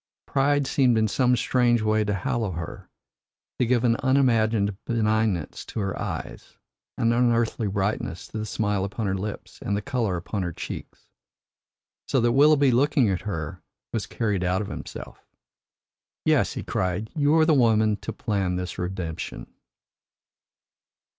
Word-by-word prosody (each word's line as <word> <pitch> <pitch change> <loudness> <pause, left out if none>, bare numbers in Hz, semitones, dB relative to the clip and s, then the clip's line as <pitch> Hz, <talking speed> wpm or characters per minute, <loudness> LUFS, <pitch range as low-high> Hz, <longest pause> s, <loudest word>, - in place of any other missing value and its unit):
Pride 140 +1 +2
seemed 130 -4 +3
in 110 0 +3
some 125 +3 +2
strange 120 -2 +2
way 110 0 +2
to 105 -1 -1
hallow 105 +1 -1
her, 80 -1 -7 0.7
to 125 - +2
give 120 -1 +2
an 115 -1 +3
unimagined 115 -6 +2
benignance 110 - 0
to - - -5
her 100 -2 -2
eyes, - - -6 0.4
an 115 0 +2
unearthly 120 -2 +2
brightness 95 -3 -2
to 110 - -6
the 110 - -4
smile 105 -2 0
upon 105 +3 -3
her 95 - 0
lips 100 +2 -6
and 100 - -1
the - - -2
colour 120 -9 -1
upon 95 +4 -4
her 90 -1 -2
cheeks. - - -8 1.0
So 130 - +2
that 120 0 +3
Willoughby, 140 +1 +5
looking 130 -3 +3
at 90 - -1
her, 80 0 -5 0.3
was 110 - -2
carried 105 -5 -1
out 90 +3 +1
of 100 - -7
himself. - - -8 1.0
"Yes," - - +3
he - - -5
cried, 95 +4 -2
"you 145 -1 +3
were 160 -1 +5
the 160 - +4
woman 110 -5 +4
to - - -6
plan 95 -4 -1
this 90 0 -4
redemption." 90 -3 -5
110 Hz, 155 wpm, -25 LUFS, 95-125 Hz, 1.0 s, Willoughby